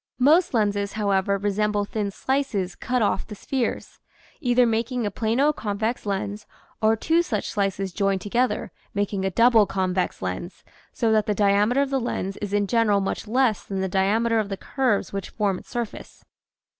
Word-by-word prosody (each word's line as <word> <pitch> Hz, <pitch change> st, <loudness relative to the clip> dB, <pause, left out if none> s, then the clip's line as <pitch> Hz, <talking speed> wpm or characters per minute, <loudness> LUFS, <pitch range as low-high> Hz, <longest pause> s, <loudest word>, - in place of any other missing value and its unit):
Most 300 Hz, +4 st, +4 dB
lenses, 205 Hz, -2 st, 0 dB
however, 200 Hz, -2 st, +1 dB
resemble 205 Hz, +1 st, 0 dB
thin 205 Hz, -1 st, -2 dB
slices 205 Hz, -5 st, -1 dB
cut 250 Hz, -2 st, -1 dB
off 205 Hz, -, 0 dB
the 210 Hz, -, -8 dB
spheres, 250 Hz, +3 st, -3 dB, 0.4 s
either 245 Hz, -1 st, +3 dB
making 230 Hz, +1 st, 0 dB
a 205 Hz, -, -1 dB
plano 235 Hz, +8 st, +1 dB
convex 220 Hz, 0 st, -3 dB
lens 200 Hz, +1 st, -3 dB, 0.3 s
or 220 Hz, 0 st, +4 dB
two 325 Hz, +9 st, +2 dB
such 220 Hz, -, -3 dB
slices 195 Hz, -2 st, -1 dB
joined 195 Hz, -1 st, +1 dB
together, 240 Hz, +6 st, 0 dB, 0.2 s
making 200 Hz, -1 st, -1 dB
a -, -, +2 dB
double 230 Hz, +1 st, +5 dB
convex 185 Hz, -1 st, -1 dB
lens, 95 Hz, -, -5 dB, 0.3 s
so 230 Hz, -3 st, 0 dB
that 215 Hz, -1 st, +2 dB
the 210 Hz, -, +1 dB
diameter 210 Hz, +6 st, +3 dB
of 275 Hz, -, -5 dB
the 270 Hz, -, +1 dB
lens 195 Hz, -5 st, -3 dB
is 205 Hz, -2 st, -5 dB
in 205 Hz, 0 st, +2 dB
general 215 Hz, -1 st, +2 dB
much 195 Hz, +2 st, -3 dB
less 245 Hz, -1 st, +2 dB
than 195 Hz, -1 st, -4 dB
the 190 Hz, -, 0 dB
diameter 215 Hz, +5 st, +2 dB
of 210 Hz, -2 st, -2 dB
the 195 Hz, -, -3 dB
curves 250 Hz, -6 st, -1 dB
which 195 Hz, -1 st, -4 dB
form 200 Hz, -4 st, -1 dB
its -, -, -18 dB
surface. 240 Hz, -3 st, -6 dB
210 Hz, 175 wpm, -24 LUFS, 200-235 Hz, 0.4 s, double